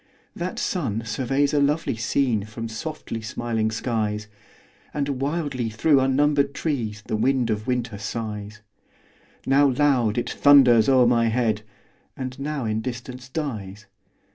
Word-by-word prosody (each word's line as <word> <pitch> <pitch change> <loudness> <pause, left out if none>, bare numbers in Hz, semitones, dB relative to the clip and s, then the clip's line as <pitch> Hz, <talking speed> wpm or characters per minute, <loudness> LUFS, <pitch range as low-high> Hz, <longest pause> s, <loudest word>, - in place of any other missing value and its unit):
That 180 +1 -4
sun 120 - -1
surveys 135 +6 0
a 145 - +3
lovely 145 0 +1
scene 120 -2 0
From 115 +1 -6
softly 115 0 -5
smiling 110 0 -2
skies; 110 -2 -2 0.7
And 140 -2 -2
wildly 140 -5 -1
through 135 +6 +3
unnumbered 140 +2 +2
trees 115 -9 -2
The - - -2
wind 125 +1 +1
of 105 0 -3
winter 120 -5 -2
sighs: 105 -1 -5 0.8
Now 140 +2 +4
loud, 125 -5 +2
it 120 - -1
thunders 130 -6 +6
o'er 130 -2 +5
my 120 -1 +3
head, 110 -2 +1 0.6
And 130 0 -5
now 140 -2 -3
in 110 0 -1
distance 125 +1 -7
dies. 105 -9 -5
125 Hz, 135 wpm, -24 LUFS, 110-140 Hz, 0.8 s, thunders